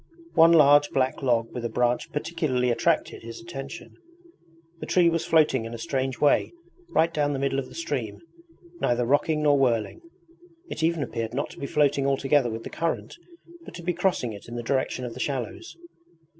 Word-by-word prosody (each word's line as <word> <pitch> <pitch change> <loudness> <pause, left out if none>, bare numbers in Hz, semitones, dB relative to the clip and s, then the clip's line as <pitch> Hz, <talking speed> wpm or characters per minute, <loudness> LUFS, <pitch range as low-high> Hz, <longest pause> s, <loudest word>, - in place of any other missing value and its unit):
One 165 +1 +6
large 145 -2 +6
black 130 +1 0
log 120 -4 0
with 125 - -5
a 120 - -2
branch 120 +2 0
particularly 150 -6 -1
attracted 120 - 0
his 115 0 -9
attention. 140 -6 -8 0.9
The - - -7
tree 175 -2 +4
was 165 -1 -2
floating 150 -7 +3
in 115 +1 -6
a - - -6
strange 130 +1 -2
way 145 - +3 0.4
right 165 - +2
down 145 -1 0
the - - -2
middle 135 0 0
of 135 - -5
the - - -14
stream, 335 0 -3 0.6
neither 120 0 +1
rocking 150 +4 +1
nor 145 -2 +4
whirling. 120 - 0 0.7
It - - -4
even 165 -1 +1
appeared 115 -2 -4
not 140 - -2
to - - -13
be 140 - -4
floating 140 -2 +2
altogether 135 -1 +2
with 115 0 -5
the - - -8
current, 165 +1 -3 0.5
but - - -11
to 175 - -9
be 180 +1 0
crossing 175 - 0
it 100 - -11
in 120 - -8
the 120 - -4
direction 130 0 -1
of 120 - -6
the - - -10
shallows. 135 - -4
140 Hz, 190 wpm, -25 LUFS, 120-155 Hz, 0.9 s, One